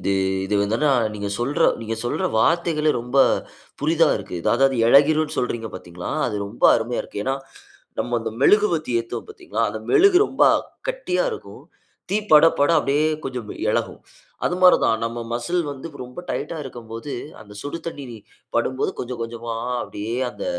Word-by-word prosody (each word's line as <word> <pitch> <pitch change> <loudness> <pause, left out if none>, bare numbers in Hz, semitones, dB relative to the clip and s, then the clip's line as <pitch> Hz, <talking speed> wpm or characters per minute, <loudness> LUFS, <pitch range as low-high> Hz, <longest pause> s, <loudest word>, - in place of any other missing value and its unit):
இது 100 +2 0 0.3
இது 105 - -1
வந்துனா 115 +9 +1 0.2
நீங்க 100 -1 -4
சொல்ற 125 +5 0 0.2
நீங்க 115 0 -3
சொல்ற 120 - -1
வார்த்தைகளே 155 +3 +2
ரொம்ப 125 +3 -4 0.7
புதிதா 160 +1 +3
இருக்கு. 90 - -6 0.2
அதாவது 135 +1 +3
இளகிரும்னு 150 +4 +4
சொல்றீங்க 115 -3 -2
பார்த்தீங்களா? 90 -1 -7 0.2
அது 105 -3 -3
ரொம்ப 105 +4 -4
அருமையா 120 +1 -2
இருக்கு. 105 - -6
ஏன்னா. 135 +1 +1 0.6
நம்ம 120 0 0
அந்த 115 - -4
மெழுகு 210 +6 +5
பத்தி 155 -6 -3
ஏத்துவோம் 115 0 -6
பார்த்தீங்களா? - - -5
அந்த 110 - -5
மெழுகு 385 -1 +6
ரொம்ப - - -1 0.5
கட்டியா - - -1
இருக்கும். 440 - -9 0.5
தீ 200 - +2 0.2
பட 155 +2 +9
பட 145 +3 +4
அப்டியே 145 +1 +1 0.2
கொஞ்சம் 125 -5 -5 0.2
எளகும். - - -2 0.4
அது 180 - +1
மாதிரி 180 - +8
தான் 110 -1 +2
நம்ம 115 +1 -3
மஸ்ல் 125 +10 -1
வந்து 140 +2 -6 0.2
ரொம்ப 125 +5 -11
டைட்டா 170 - -3
இருக்கும்போது 120 +1 -8 0.3
அந்த 105 -1 -13
சுடு 145 +4 -5
தண்ணீர் 135 -7 -6 0.4
படும்போது 130 0 0
கொஞ்சம் 125 -1 -5
கொஞ்சமா 115 0 -5 0.3
அப்டியே 110 +4 -5
அந்த - - -7
125 Hz, 155 wpm, -22 LUFS, 115-155 Hz, 0.7 s, பட